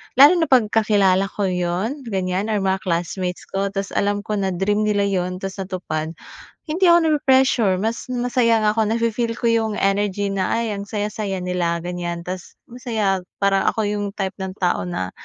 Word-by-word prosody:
lalo 290 +7 +8
na 325 - +2
'pag 240 -5 +4
kakilala 200 -3 +3
ko 205 - -2
yun 185 +9 -1
ganyan 190 -1 -1
or 215 - +1
mga 190 0 0
classmates 180 +1 -2
ko, 195 +1 -2
tas 195 0 -4
alam 205 0 0
ko 215 - -3
na 195 -1 0
dream 205 +3 +1
nila 205 -1 +2
yun 185 -2 -1
tapos 195 +1 -6
natupad, 180 -5 -4 0.6
hindi 355 +5 +2
ako 340 - +7
nape-pressure, 260 -10 +3
mas 225 +2 -2
masaya 240 -2 +2
nga 210 0 +2
ako 220 - +3
nafi-feel 230 0 0
ko 235 - -2
yung 225 -2 +1
energy 200 0 0
na 195 +3 0
ay 220 -3 -2
ang 200 - -6
saya-saya 205 -2 -3
nila 175 -2 -1
ganyan, 175 -1 -4
tas 180 +1 -7 0.2
masaya 220 -6 -1 0.2
parang 195 -1 +2
ako 220 - -2
yung 205 0 -2
type 195 -2 -3
ng 190 -1 -4
tao 180 - +1
na, 95 - -3
200 Hz, 180 wpm, -21 LUFS, 185-225 Hz, 0.6 s, lalo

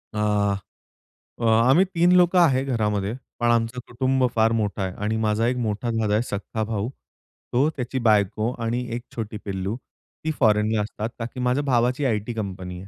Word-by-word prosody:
आ, 105 -1 +1 0.9
अ, - - -4
आम्ही 115 +10 +5
3 175 +1 +4
लोकं 180 0 +5
आहे 135 -6 +4
घरामध्ये. 105 -5 0 0.3
पण, 120 -1 +2
आमचं 115 +1 0
कुटुंब 130 +1 +1
फार 110 0 +4
मोठा 105 -3 -1
आहे 95 -1 -3
आणि 110 +1 0
माझा 110 +1 +1
एक 125 +1 0
मोठा 110 0 -2
दादा 110 -2 0
आहे, 105 - +3
सख्खा 110 0 -4
भाऊ. 110 0 -2 0.6
तो, 135 +5 +3
त्याची 130 0 -3
बायको 105 +2 +2
आणि 120 +2 -1
एक 120 - -4
छोटी 110 -2 -4
पिल्लू, 95 +1 -3 0.5
ती 160 - 0
फॉरेनला 105 -2 +3
असतात. 105 +1 -4
कारण, 115 - -2
की 130 - -7
माझ्या 125 +3 +1
भावाची 125 +1 +1
आयटी 110 -1 -1
कंपनी 95 -4 -5
आहे. 95 - -11
115 Hz, 175 wpm, -24 LUFS, 105-125 Hz, 0.9 s, आम्ही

